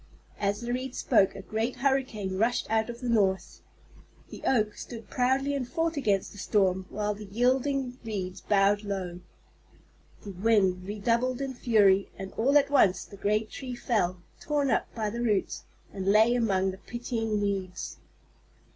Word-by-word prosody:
As 205 +1 0
the 240 +1 -2
Reeds 255 0 -4
spoke 195 -6 +3
a 195 - -8
great 220 +6 -2
hurricane 250 -7 0
rushed 235 +3 +1
out 220 +1 +1
of 235 +1 -7
the 250 - -3
north. 200 -5 +1 0.7
The - - -9
Oak 215 -5 +2
stood 230 -3 -9
proudly 265 +3 +1
and 270 -3 -2
fought 330 +3 -1
against 205 -9 0
the 205 - -12
storm, 190 -2 +1
while 210 0 -1
the 210 +1 -9
yielding 255 +4 0
Reeds 190 -5 -4
bowed 205 0 +3
low. 190 -4 -4 1.0
The 205 - -7
wind 190 -2 +2
redoubled 235 +5 0
in 270 -1 -3
fury, 205 -6 +3
and 195 0 -6
all 275 +6 +3
at 280 0 +2
once 200 -10 +4
the - - -12
great 210 +2 0
tree 255 -2 -6
fell, 185 -8 -1 0.2
torn 290 -3 0
up - - +1
by 215 -2 -2
the 235 +2 -4
roots, 210 -5 0 0.3
and 190 -1 -4
lay 215 +4 +5
among 195 -6 +1
the 190 - -11
pitying 225 0 -3
Reeds. 195 -3 -3
215 Hz, 165 wpm, -28 LUFS, 195-245 Hz, 1.0 s, lay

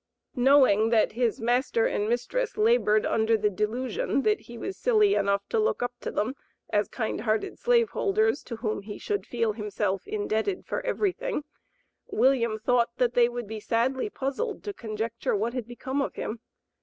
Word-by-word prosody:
Knowing 250 -5 +5
that 225 -2 +3
his 235 -1 0
master 240 0 +1
and 205 +1 0
mistress 445 - -1
labored 425 - +3
under 225 0 +2
the 210 -1 +1
delusion 235 +6 -1
that 425 0 +2
he 235 - -11
was 385 +11 -5
silly 425 -5 +3
enough 200 - +1
to 455 - 0
look 430 - +1
up 245 0 -2
to - - -3
them 220 +5 -1 0.4
as 205 -1 +2
kind 220 -3 -3
hearted 215 -1 -1
slave 475 -2 +3
holders, 435 +2 +1
to 235 - -7
whom 220 -3 -3
he 205 +1 -8
should 410 -1 -3
feel 230 -2 0
himself 205 -3 -2
indebted 215 - -1
for - - -3
everything, 445 -4 -1 0.6
William 235 -4 +2
thought 235 +1 +2
that 245 -1 +2
they 240 -1 +4
would 240 -1 -5
be 220 +1 -6
sadly 250 - 0
puzzled 340 - -3
to 410 - -4
conjecture 225 - -3
what 225 +4 -1
had 250 -3 -4
become 260 +3 -3
of - - -3
him. 225 - -4
240 Hz, 175 wpm, -27 LUFS, 215-295 Hz, 0.6 s, Knowing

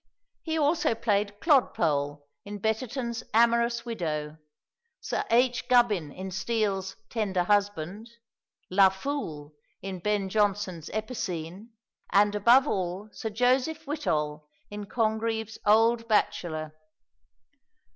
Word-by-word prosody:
He 320 -1 -2
also 300 -5 +2
played 205 -2 0
Clodpole 150 - +2 0.2
in 205 0 -7
Betterton's 235 +3 -2
"Amorous 235 +1 +3
Widow," 155 -9 -3 0.6
Sir - - -2
H. 245 +1 +2
Gubbin 215 - +3
in 190 +3 -7
Steele's 195 -1 -1 0.2
"Tender 195 -6 0
Husband," 205 +1 -1 0.6
La 190 +1 +6
Foole 190 - -5 0.3
in 190 -1 -6
Ben 205 +1 0
Jonson's 195 -5 0
"Epicene," 200 -3 -5 0.4
and 205 +1 +4
above 235 +7 +5
all 190 +1 -2
Sir 220 - -5
Joseph 255 +8 +1
Whittol 150 - -2 0.2
in 205 0 -6
Congreve's 220 -1 -1
"Old 230 +2 +4
Bachelor." 155 -7 0
210 Hz, 105 wpm, -27 LUFS, 185-235 Hz, 0.6 s, La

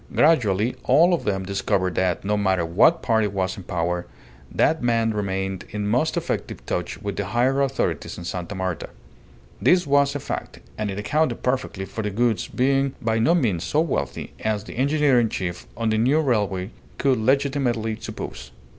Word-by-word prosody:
Gradually 120 - +3
all 175 +3 +5
of 170 - -1
them 95 -2 -1
discovered 95 -1 0
that, 90 +1 0
no 105 +1 +1
matter 95 -4 +1
what 130 - +4
party 110 -2 +2
was 95 -2 -2
in - - -8
power, 90 -1 -2 0.4
that 160 - +2
man 115 -2 +2
remained 95 -2 -2
in 105 0 -3
most 125 +9 +1
effective - - -3
touch - - -3
with 100 -2 -4
the 100 - -1
higher 125 +7 +1
authorities 130 - -1
in 90 - -7
Sta. 90 0 -4
Marta. 95 -3 -3 0.7
This 180 -1 +4
was 140 0 +3
a - - -1
fact, 65 - -5 0.2
and 105 -1 -2
it 95 - -4
accounted 150 +10 0
perfectly 125 -7 -1
for 110 - -5
the 105 - -2
Goulds 115 +1 0
being 135 +1 +1
by 115 0 0
no 160 +10 +4
means 105 - +1
so 150 - 0
wealthy 100 - -3
as 105 -2 -1
the - - -9
engineer 140 0 +3
in 115 -2 +2
chief 90 -4 -4
on 115 -1 0
the 110 - +1
new 130 +7 +3
railway 105 -8 0 0.3
could 135 -4 +2
legitimately 130 -3 +1
suppose. - - -7
110 Hz, 180 wpm, -23 LUFS, 95-135 Hz, 0.7 s, all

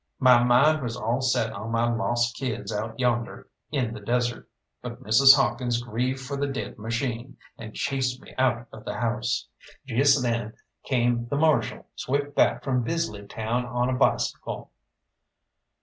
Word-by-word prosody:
My 125 -3 +6
mind 135 +6 +4
was 120 -2 -4
all 120 +3 -1
set 115 -4 +1
on 110 +2 -6
my 115 +1 +1
lost 120 0 0
kids 125 -4 -4
out 110 +2 -4
yonder 120 -2 -1 0.2
in 125 -6 -1
the 110 - -7
desert, 120 +3 -1 0.3
but - - -8
Mrs. 135 +6 +7
Hawkins 125 -3 0
grieved 125 +3 -2
for 135 +2 -5
the 140 +1 -1
dead 135 -4 -5
machine, 115 +3 -3 0.2
and 110 -1 -10
chased 130 -2 -1
me - - -15
out 120 -2 +1
of 110 - -10
the - - -5
house. 115 -1 -1 0.4
Just 135 +2 +3
then 115 -2 -1 0.3
came 120 -2 +1
the 140 - -2
Marshal 150 -6 +1
swift 145 +2 -2
back - - +2
from 130 -2 +1
Bisley 115 -7 -3
town 115 +4 -2
on 120 +1 0
a - - 0
bicycle. 125 - -1
120 Hz, 160 wpm, -26 LUFS, 115-130 Hz, 0.4 s, Mrs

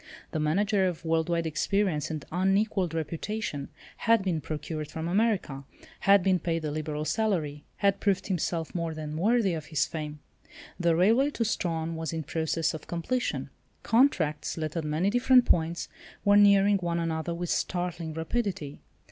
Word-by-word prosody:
The 155 - -2
manager 190 +6 +2
of 175 -2 -5
world 160 0 +1
wide 170 -1 0
experience 160 0 0
and 155 -3 -5
unequalled 190 -1 +1
reputation 165 -1 -3 0.3
had 230 -3 +3
been 175 -5 -1
procured 155 0 -5
from 160 0 -4
America; 185 -8 0 0.4
had 200 -1 +5
been 185 -1 +3
paid 165 -1 -2
the 150 - -2
liberal 150 0 -3
salary; 155 -6 -1
had 200 -1 +2
proved 195 -2 +1
himself 170 -3 -2
more 165 -2 -2
than 155 -1 -5
worthy 205 +2 +2
of 155 -2 -4
his 155 -4 +1
fame. 150 -2 -5 0.6
The 170 -2 +3
railway 225 - +4
to 235 -5 -2
Strahan 165 -6 -1
was 160 0 -4
in 160 -1 -3
process 160 +2 -1
of 160 - -8
completion. 210 +9 -2 0.3
Contracts, 190 - +2
let 155 0 -3
at 165 - -1
many 160 +6 +1
different 250 +1 +5
points, 165 0 +1 0.4
were 205 0 +6
nearing 200 0 +6
one 170 -1 -1
another 165 0 -2
with 175 0 -3
startling 175 -3 -2
rapidity. 165 -4 -3
170 Hz, 160 wpm, -28 LUFS, 160-200 Hz, 0.6 s, were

